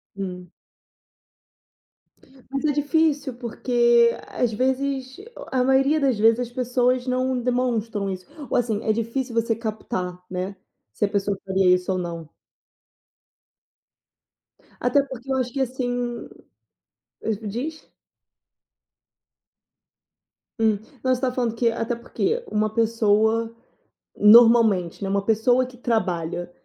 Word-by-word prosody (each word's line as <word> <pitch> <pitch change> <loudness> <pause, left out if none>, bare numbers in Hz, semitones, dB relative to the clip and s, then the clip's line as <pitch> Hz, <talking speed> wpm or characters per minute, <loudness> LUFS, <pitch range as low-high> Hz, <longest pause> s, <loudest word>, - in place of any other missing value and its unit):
Hum. 180 -3 -6 2.0
Mas 275 +2 -2
é 300 - +3
difícil, 290 -2 +1
porque, 235 -1 +3 0.2
às 245 -2 -1
vezes, 265 +3 -1 0.3
a 255 -1 +2
maioria 270 +4 +3
das 265 -5 +1
vezes, 225 +2 +4
as 245 -1 -3
pessoas 250 0 0
não 255 0 0
demonstram 235 -5 -1
isso 185 -1 -6 0.2
ou, - - +1
assim, 225 -3 -1
é 220 - +2
difícil 230 +2 -2
você 230 0 +1
captar, 210 -5 -4
né, 185 +2 -4 0.4
se 105 - 0
a - - 0
pessoa 200 -1 -1
faria 190 -1 +4
isso 180 +1 -3
ou 185 - -1
não. 170 -3 -6 2.5
Até 250 +3 +3
porque 265 -1 -8
eu 265 - +1
acho 250 -1 -1
que 270 +2 -2
assim 245 -1 -3 1.0
mas 220 -3 -1
me 215 -1 -7
diz 290 +9 -6 2.7
Hum. 220 -2 +3 0.2
Não 255 0 +2
você 250 - -8
tá 260 - +1
falando 245 -2 -1
que 230 0 +2
até 230 +1 -2
porque 435 - -2
um 215 0 +1
pessoa, 225 0 +1 0.6
normalmente, 220 -5 +6
né, 195 - -2
uma 200 0 0
pessoa 225 +4 +3
que 250 0 -13
trabalha, 175 -7 -2
235 Hz, 125 wpm, -23 LUFS, 210-255 Hz, 2.7 s, normalmente